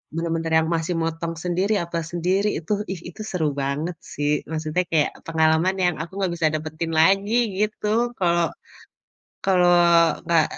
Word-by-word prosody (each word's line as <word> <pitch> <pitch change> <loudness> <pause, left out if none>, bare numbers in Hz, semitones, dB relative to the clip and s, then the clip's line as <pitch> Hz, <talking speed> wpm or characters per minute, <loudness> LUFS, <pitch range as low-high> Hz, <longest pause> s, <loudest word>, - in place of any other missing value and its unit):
Bener-bener 165 -1 -2
yang 160 - 0
masih 165 +2 -1
motong 165 +1 -2
sendiri, 185 +4 0
apa 170 0 -4
sendiri, 185 +4 +1
itu 165 - -9 0.2
ih, 190 - -4
itu 185 - -10
seru 165 -5 0
banget 150 +5 -2 0.2
sih. 145 0 0 0.2
Maksudnya 155 +2 -1
kayak 155 -3 +3 0.2
pengalaman 160 +3 +2
yang 175 -2 +2
aku 165 - -11
nggak 190 -3 0
bisa 165 -2 +2
dapetin 155 +1 -4
lagi, 195 +6 +3 0.3
gitu. 215 0 -3 0.3
Kalau 170 -2 +2 1.0
kalau 180 -2 +4 0.6
nggak 165 -2 +3
170 Hz, 145 wpm, -23 LUFS, 160-180 Hz, 1.0 s, kalau